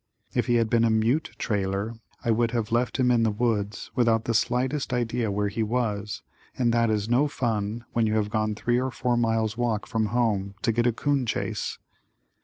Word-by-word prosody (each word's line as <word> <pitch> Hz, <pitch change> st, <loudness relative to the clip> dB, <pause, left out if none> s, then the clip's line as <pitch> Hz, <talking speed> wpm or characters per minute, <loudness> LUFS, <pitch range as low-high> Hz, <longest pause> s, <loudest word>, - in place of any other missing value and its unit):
If -, -, 0 dB
he 120 Hz, -, +3 dB
had 115 Hz, -1 st, +3 dB
been 115 Hz, +1 st, +3 dB
a 115 Hz, -, +4 dB
mute 115 Hz, +8 st, +1 dB
trailer 100 Hz, +1 st, -1 dB, 0.3 s
I 115 Hz, -, +3 dB
would 115 Hz, +1 st, +2 dB
have 115 Hz, -2 st, -2 dB
left 120 Hz, +1 st, +1 dB
him 125 Hz, -2 st, +3 dB
in 120 Hz, -2 st, +3 dB
the 115 Hz, -, +3 dB
woods 105 Hz, -2 st, -1 dB
without 115 Hz, -3 st, +2 dB
the 115 Hz, -, 0 dB
slightest 125 Hz, +4 st, 0 dB
idea 120 Hz, -2 st, 0 dB
where 100 Hz, +1 st, 0 dB
he 115 Hz, -, -3 dB
was 105 Hz, -3 st, -2 dB, 0.3 s
and 120 Hz, -2 st, +2 dB
that 115 Hz, -1 st, +3 dB
is 105 Hz, -1 st, 0 dB
no 125 Hz, +5 st, +3 dB
fun 115 Hz, -4 st, -2 dB
when 115 Hz, -2 st, +2 dB
you 110 Hz, -, 0 dB
have 105 Hz, -1 st, 0 dB
gone 110 Hz, -1 st, 0 dB
three 120 Hz, +3 st, +1 dB
or 130 Hz, -, -1 dB
four 125 Hz, -1 st, 0 dB
miles 115 Hz, -2 st, +1 dB
walk 115 Hz, -4 st, 0 dB
from 110 Hz, -2 st, 0 dB
home 105 Hz, -4 st, 0 dB
to 115 Hz, -, +3 dB
get 120 Hz, +2 st, +1 dB
a -, -, +4 dB
'coon 135 Hz, +1 st, 0 dB
chase. -, -, -2 dB
115 Hz, 205 wpm, -26 LUFS, 110-120 Hz, 0.3 s, a